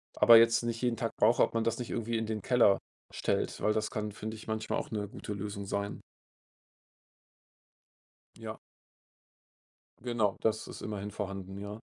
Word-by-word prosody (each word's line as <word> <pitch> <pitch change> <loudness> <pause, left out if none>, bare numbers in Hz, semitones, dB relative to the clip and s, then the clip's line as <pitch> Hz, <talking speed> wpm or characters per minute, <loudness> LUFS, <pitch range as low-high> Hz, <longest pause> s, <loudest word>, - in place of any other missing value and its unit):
aber 115 -1 +9
jetzt 115 +1 +5
nicht 115 0 -2
jeden 120 -2 +1
Tag - - -1
brauche, - - +4
ob - - 0
man 115 - +1
das 115 - 0
nicht 120 - -5
irgendwie 115 0 -1
in 110 - -1
den 110 -1 -3
Keller 115 -3 +4 0.4
stellt, - - -1
weil 105 - +3
das 110 0 -1
kann, 105 -1 -3
finde 110 +2 -6
ich, 110 - -12
manchmal 110 0 -1
auch - - -6
'ne 105 -2 -2
gute 105 - -6
Lösung 100 0 -5
sein. 100 +1 -3 2.4
Ja. - - -6 1.5
Genau, 115 -5 0
das 110 -1 0
ist - - -9
immerhin 105 -1 -4
vorhanden, 95 -2 -5
ja. 105 +2 -7
110 Hz, 165 wpm, -31 LUFS, 105-115 Hz, 2.4 s, aber